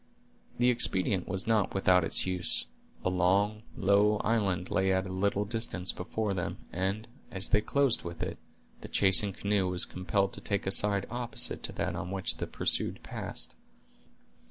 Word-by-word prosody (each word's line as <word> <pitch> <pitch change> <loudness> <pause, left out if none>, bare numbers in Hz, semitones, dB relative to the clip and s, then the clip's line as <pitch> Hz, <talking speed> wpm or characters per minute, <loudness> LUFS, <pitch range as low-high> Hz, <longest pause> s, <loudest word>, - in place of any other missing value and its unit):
The 125 +1 +3
expedient 95 -5 +2
was 95 0 -1
not 110 -3 0
without 90 -2 +3
its - - +3
use. 90 -1 +3 0.4
A - - +2
long, 100 +4 +1 0.2
low 100 +2 +3
island 100 -6 -1
lay 95 0 +1
at 95 0 0
a 95 - -7
little 100 +2 -1
distance 105 -4 -1
before 105 +3 -4
them, 90 -3 -4 0.2
and, 95 +5 -3 0.2
as 95 0 0
they 105 - +3
closed 140 +1 +1
with 85 0 -7
it, - - -6 0.4
the - - -10
chasing 100 +1 +3
canoe 100 0 -1
was 90 -1 +1
compelled 95 +1 -2
to - - -4
take 100 -2 -2
a 95 - -1
side 100 0 +3
opposite 120 0 -2
to - - -1
that - - -3
on 90 - -5
which 95 0 -1
the - - -5
pursued - - +2
passed. - - -7
95 Hz, 170 wpm, -29 LUFS, 95-105 Hz, 0.4 s, The